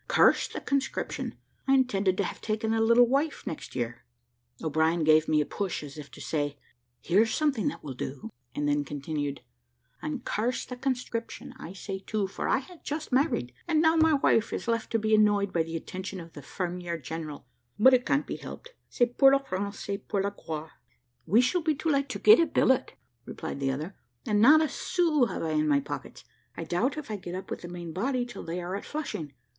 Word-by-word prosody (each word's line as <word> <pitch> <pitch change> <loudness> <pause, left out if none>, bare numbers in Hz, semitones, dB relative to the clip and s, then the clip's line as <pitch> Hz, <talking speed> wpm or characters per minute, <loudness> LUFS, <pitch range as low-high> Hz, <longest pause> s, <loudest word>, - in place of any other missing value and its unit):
Curse - - +4
the - - -6
conscription: 275 -1 -2 0.3
I 270 - +5
intended 200 -8 +2
to 200 - +2
have - - -5
taken 220 +1 -1
a 225 - +2
little 235 +2 +6
wife 280 +5 0
next 160 - -6
year." 120 -1 -3 0.6
O'Brien 160 +2 +2
gave 155 0 +5
me 155 -1 +3
a - - 0
push, 195 -3 -3
as 140 -2 -9
if 150 -2 -9
to - - -13
say, 145 -2 -2 0.4
"Here's 215 +6 +3
something 295 -6 +1
that 285 - -3
will 140 -3 -5
do," 130 +1 -6 0.2
and 145 0 0
then 145 0 +2
continued 145 0 -4 0.6
"And 150 - -4
curse 235 +4 -1
the 250 - -6
conscription 245 -3 -3
I 175 - -8
say 195 0 -5
too, 205 +1 -2
for 190 - -4
I - - +4
had 320 +6 -10
just 300 0 -4
married, 255 - +1
and 320 -2 +3
now 320 +1 +4
my 320 -1 +5
wife 230 -5 +3
is - - -4
left 230 -1 0
to - - +4
be 220 0 0
annoyed 205 -2 +4
by 170 - +2
the 165 +1 -3
attention 185 +3 -6
of 165 -1 -11
the 145 - -9
fermier 175 +3 -4
general. 155 -1 -6 0.3
But 260 +5 +7
it 250 -1 +4
can't 285 +2 +1
be - - -5
helped. 480 - -10 0.2
C'est 245 -1 +1
pour 270 -1 +8
la - - +6
France 200 -7 -4
et 200 0 -4
pour 200 -2 0
la 200 - 0
gloire." 160 -5 -6 0.6
"We 215 +8 +5
shall 340 +8 +1
be 310 -1 +1
too 325 - -2
late 280 -2 +1
to - - -3
get 430 - +7
a 335 - +4
billet," 260 -1 +2 0.3
replied - - -6
the 135 -1 0
other, 150 +8 -4 0.3
"and 210 -1 +2
not 300 +7 +8
a 315 - +2
sou 315 -4 +1
have - - -4
I 160 - -1
in 155 0 +2
my 145 -1 +4
pockets. 140 - -7 0.3
I - - -3
doubt 200 - 0
if 300 -7 -6
I 210 - -2
get 180 -2 -7
up 190 - -7
with - - -4
the 175 - -7
main 175 -2 -7
body 245 - 0
till 240 -4 -8
they 170 +2 -4
are 180 +2 -3
at 200 - -5
Flushing. 210 - -5
200 Hz, 215 wpm, -28 LUFS, 160-260 Hz, 0.6 s, pour